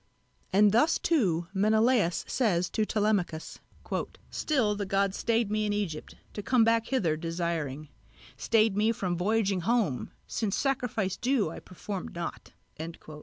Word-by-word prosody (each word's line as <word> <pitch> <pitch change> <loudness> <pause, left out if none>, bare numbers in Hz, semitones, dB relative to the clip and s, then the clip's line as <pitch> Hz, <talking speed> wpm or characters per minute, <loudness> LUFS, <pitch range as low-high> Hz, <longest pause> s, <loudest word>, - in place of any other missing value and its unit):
And 205 +2 +5
thus 300 +10 +4
too 185 - +1
Menelaos 215 -2 +2
says 180 -8 +1
to 215 -1 0
Telemachos: 205 -7 -1 0.7
"Still 245 -9 +1
the 205 0 -3
gods 195 0 +1
stayed 230 -2 0
me 215 0 +1
in 205 - 0
Egypt, 185 -7 -4 0.2
to 205 - -4
come 245 +2 +3
back 230 0 +2
hither 190 -13 +1
desiring, 165 -3 -3 0.5
Stayed 220 -2 +2
me 215 +2 +2
from 185 -5 -2
voyaging 195 +1 +1
home, 215 - 0 0.2
since 210 -3 -2
sacrifice 245 -8 -1
due 245 -9 +1
I - - -7
performed 185 0 -7
not." 170 0 -6
205 Hz, 135 wpm, -29 LUFS, 175-225 Hz, 0.7 s, And